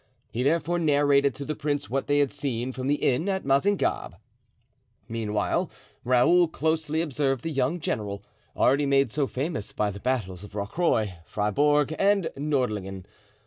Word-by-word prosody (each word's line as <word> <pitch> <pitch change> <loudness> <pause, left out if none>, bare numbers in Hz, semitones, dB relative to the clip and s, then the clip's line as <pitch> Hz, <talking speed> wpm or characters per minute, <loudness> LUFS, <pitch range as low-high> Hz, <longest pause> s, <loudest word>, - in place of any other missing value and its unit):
He 115 - -2
therefore 165 +5 +1
narrated 145 -3 +3
to 140 - -6
the 155 - -2
prince 145 -1 -2
what 135 +2 -2
they 145 - +2
had 145 -2 +2
seen 130 -4 -3
from 130 0 -5
the 145 - +3
inn 145 +6 0
at 190 -1 -2
Mazingarbe. 140 +9 +1 0.9
Meanwhile 105 -2 -1 0.3
Raoul 130 +9 +4
closely 160 0 -1
observed 135 -4 -1
the 165 - -3
young 135 +4 0
general, 105 -9 -3 0.3
already 140 +2 +3
made 135 -3 +3
so 140 +1 0
famous 140 - -4
by 105 -1 0
the 100 - -8
battles 100 -7 -2
of 105 0 -11
Rocroy, 105 - 0
Fribourg, 145 +8 +2
and 200 -3 +2
Nordlingen. 110 -10 -2
140 Hz, 150 wpm, -26 LUFS, 115-150 Hz, 0.9 s, Raoul